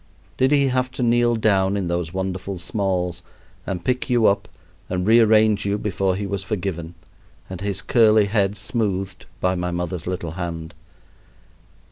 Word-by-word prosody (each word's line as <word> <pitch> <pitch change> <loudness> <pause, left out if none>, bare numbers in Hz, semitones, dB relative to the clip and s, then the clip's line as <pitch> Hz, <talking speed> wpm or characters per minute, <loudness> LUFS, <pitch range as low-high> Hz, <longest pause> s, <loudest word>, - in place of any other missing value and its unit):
Did 130 +2 +3
he 140 -2 +4
have 125 0 0
to 125 - -2
kneel 120 0 +3
down 100 -3 +2
in 95 -3 -2
those 85 -1 -2
wonderful 95 +1 -4
smalls 90 -2 -2 0.5
and 90 -2 -4
pick 125 +1 -1
you 120 -3 +3
up 100 - +2 0.4
and 90 0 -1
rearrange 110 -2 +5
you 100 0 0
before 95 -3 -1
he 100 +1 -3
was 100 -1 -3
forgiven 90 -5 -4 0.5
and 95 -1 -7
his 100 -2 -3
curly 110 0 +4
head 100 -1 0
smoothed 95 -3 -2
by 90 0 +1
my 90 -1 -2
mother's 85 -1 -4
little 90 -3 -3
hand? 85 -1 -5
95 Hz, 155 wpm, -22 LUFS, 90-110 Hz, 0.5 s, rearrange